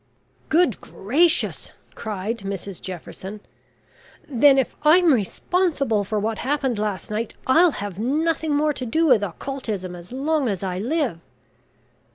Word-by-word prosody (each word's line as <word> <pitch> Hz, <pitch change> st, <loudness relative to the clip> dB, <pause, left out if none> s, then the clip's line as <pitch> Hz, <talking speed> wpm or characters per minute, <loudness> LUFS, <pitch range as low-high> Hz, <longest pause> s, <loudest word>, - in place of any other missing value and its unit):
"Good 315 Hz, -, +3 dB
gracious!" 305 Hz, -, +1 dB, 0.2 s
cried 215 Hz, +1 st, -4 dB
Mrs 195 Hz, -1 st, -6 dB
Jefferson; 190 Hz, +3 st, -8 dB, 0.9 s
"then, 275 Hz, 0 st, +5 dB
if 265 Hz, -, 0 dB
I'm 320 Hz, +1 st, +6 dB
responsible 275 Hz, -, 0 dB
for 215 Hz, +2 st, -3 dB
what 220 Hz, +1 st, -2 dB
happened 265 Hz, -4 st, -1 dB
last 210 Hz, -1 st, -3 dB
night, 215 Hz, +1 st, -3 dB
I'll 330 Hz, +7 st, +5 dB
have 200 Hz, -2 st, -6 dB
nothing 310 Hz, +5 st, 0 dB
more 300 Hz, +1 st, +2 dB
to 255 Hz, -, -5 dB
do 320 Hz, +8 st, +2 dB
with 250 Hz, -9 st, +5 dB
Occultism 205 Hz, -2 st, -4 dB
as 175 Hz, +3 st, -12 dB
long 280 Hz, 0 st, 0 dB
as 195 Hz, -2 st, -3 dB
I 185 Hz, -1 st, -2 dB
live." 250 Hz, -, -1 dB
240 Hz, 135 wpm, -23 LUFS, 200-295 Hz, 0.9 s, I'm